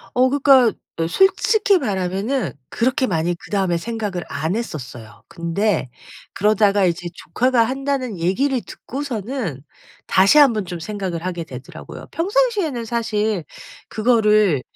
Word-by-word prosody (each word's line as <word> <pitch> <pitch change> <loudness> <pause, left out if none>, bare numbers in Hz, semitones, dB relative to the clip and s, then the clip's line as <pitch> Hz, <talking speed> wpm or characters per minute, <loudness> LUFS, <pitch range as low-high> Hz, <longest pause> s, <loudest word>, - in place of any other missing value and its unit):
어 255 +1 +4
그러니까 270 -4 +5 0.4
솔직히 395 - +3
말하면은 200 - -2 0.2
그렇게 255 +2 0
많이 170 -1 0
그 170 - -12
다음에 190 -4 +1
생각을 205 -3 -4
안 160 +6 -2
했었어요. 125 - -7
근데 170 -2 -1 0.5
그러다가 205 -1 +3
이제 175 0 -1
"조카가 250 +2 +1
한다."는 260 -4 -2
얘기를 245 +9 +1
듣고서는 235 - -5 0.4
다시 195 +10 +4
한번 235 -9 +5
좀 175 -1 -6
생각을 180 -2 -4
하게 175 -2 -3
되더라고요. 130 -2 -10
평상시에는 380 - 0
사실 220 -4 -1 0.5
그거를 215 - +3
215 Hz, 305 characters per minute, -20 LUFS, 180-255 Hz, 0.5 s, 그러니까